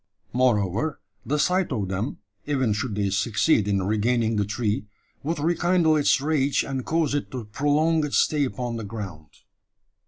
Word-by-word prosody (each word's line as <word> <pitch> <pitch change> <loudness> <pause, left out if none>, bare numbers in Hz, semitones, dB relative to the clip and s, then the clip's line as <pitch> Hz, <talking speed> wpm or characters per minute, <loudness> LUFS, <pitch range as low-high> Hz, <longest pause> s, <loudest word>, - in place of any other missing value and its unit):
Moreover, 120 - +1 0.2
the 150 - -1
sight 180 +3 +1
of 105 -7 -1
them 100 +7 -3 0.3
even 130 -7 +1
should 105 +1 -3
they 100 -2 0
succeed 105 - +2
in 100 -2 +1
regaining 110 +3 +1
the 105 -1 +1
tree 105 0 -2 0.3
would 160 +3 -2
rekindle 170 +1 +2
its 145 -2 +3
rage, 145 -1 +1
and 135 -2 -3
cause 160 -1 0
it 145 - -2
to 125 -5 -6
prolong 150 +7 +1
its 150 - 0
stay 150 -2 +2
upon 125 -3 -3
the 115 - -5
ground. 100 -8 -7
125 Hz, 160 wpm, -25 LUFS, 105-150 Hz, 0.3 s, its